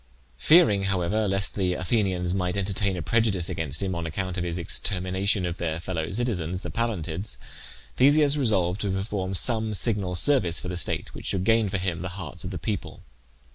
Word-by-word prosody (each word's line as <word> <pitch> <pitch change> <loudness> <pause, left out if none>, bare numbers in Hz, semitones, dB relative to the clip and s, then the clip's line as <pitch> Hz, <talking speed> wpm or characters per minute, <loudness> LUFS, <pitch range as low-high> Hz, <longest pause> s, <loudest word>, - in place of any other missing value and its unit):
Fearing, 105 - +5
however, 95 +3 0
lest 95 0 +2
the 90 -3 0
Athenians 90 -3 0
might 90 0 -1
entertain 100 -1 -1
a 85 - -4
prejudice 105 -4 +1
against 80 +2 -2
him 95 -1 -1
on 85 -1 -3
account 90 +3 -3
of 90 - -2
his 85 -1 -3
extermination 95 +3 0
of 85 0 -3
their 80 -1 -2
fellow 85 -2 -3
citizens, 95 -6 -2
the - - -5
Pallantids, 100 -5 -3 0.6
Theseus 145 +2 +5
resolved 105 -8 +1
to 100 - -1
perform 95 0 -2
some 110 +1 +1
signal 100 -4 0
service 90 - +3
for 90 - -5
the 90 - -3
state, - - +1
which - - -8
should 95 -2 0
gain 115 0 +3
for 100 - -1
him 90 -2 -2
the 90 - -4
hearts 85 -7 -6
of - - -4
the - - -5
people. - - -4
95 Hz, 185 wpm, -26 LUFS, 90-105 Hz, 0.6 s, Fearing